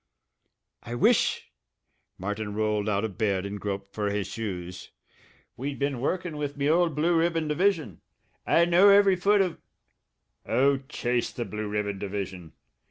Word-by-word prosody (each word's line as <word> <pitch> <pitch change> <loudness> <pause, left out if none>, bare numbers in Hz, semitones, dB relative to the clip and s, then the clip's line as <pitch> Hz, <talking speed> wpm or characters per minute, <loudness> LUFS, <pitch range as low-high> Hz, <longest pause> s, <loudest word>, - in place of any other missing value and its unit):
"I 120 0 -6
wish" 120 - +2 0.7
Martin 105 +2 -4
rolled 105 -1 0
out 100 +1 0
of 105 -1 -7
bed 100 -3 0
and 100 +1 -5
groped 100 -1 -4
for 105 -1 -1
his 100 -1 -1
shoes 90 -4 -6 0.7
"we'd 135 +2 -4
been 140 -3 -2
workin' 170 +2 -2
with 145 -1 -4
me 140 0 0
old 165 0 +2
Blue 165 +3 +2
Ribbon 165 -1 +1
division. 155 - 0 0.4
I 170 - +4
know 175 +4 +6
every 200 -1 +6
foot 200 +3 +3
o' 180 -3 -1 0.5
" - - -52
"Oh, 140 +2 +3
chase 120 -4 -1
the 120 - -4
Blue 105 0 -5
Ribbon 105 -1 -2
division! 95 -4 -5
120 Hz, 155 wpm, -27 LUFS, 100-165 Hz, 0.7 s, know